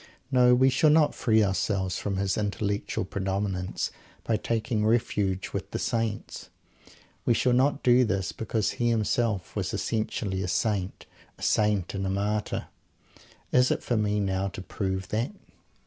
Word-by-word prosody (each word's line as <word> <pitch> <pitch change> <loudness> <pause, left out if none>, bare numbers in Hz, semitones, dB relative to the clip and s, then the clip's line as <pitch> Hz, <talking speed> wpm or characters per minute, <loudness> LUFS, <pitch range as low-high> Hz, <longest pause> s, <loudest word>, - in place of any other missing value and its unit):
No, 125 -1 +6
we 130 +2 +4
shall 155 +4 +4
not 150 -1 +4
free 110 -2 +3
ourselves 95 -1 0
from 100 -2 -2
his 95 -1 0
intellectual 100 -1 -2
predominance 95 -1 -2 0.3
by 115 - +1
taking 110 0 -1
refuge 105 -4 0
with - - -4
the - - -3
Saints. 115 -2 -3 0.7
We 120 - +3
shall 125 +1 +2
not 135 +3 +2
do 125 0 +5
this 95 -5 -1
because 110 -2 -1
he 120 0 0
himself 110 -4 0
was - - -2
essentially 110 -3 -2
a 95 - -2
Saint. 100 -1 -1 0.3
A - - -11
Saint 105 -4 +1
and 95 -1 -2
a - - -1
Martyr! 105 +2 -1 0.9
Is 125 0 +4
it - - -1
for 120 - 0
me 105 -1 +1
now 95 -1 0
to 95 - -7
prove 95 -1 -3
that? 115 - -1
105 Hz, 155 wpm, -27 LUFS, 95-115 Hz, 0.9 s, No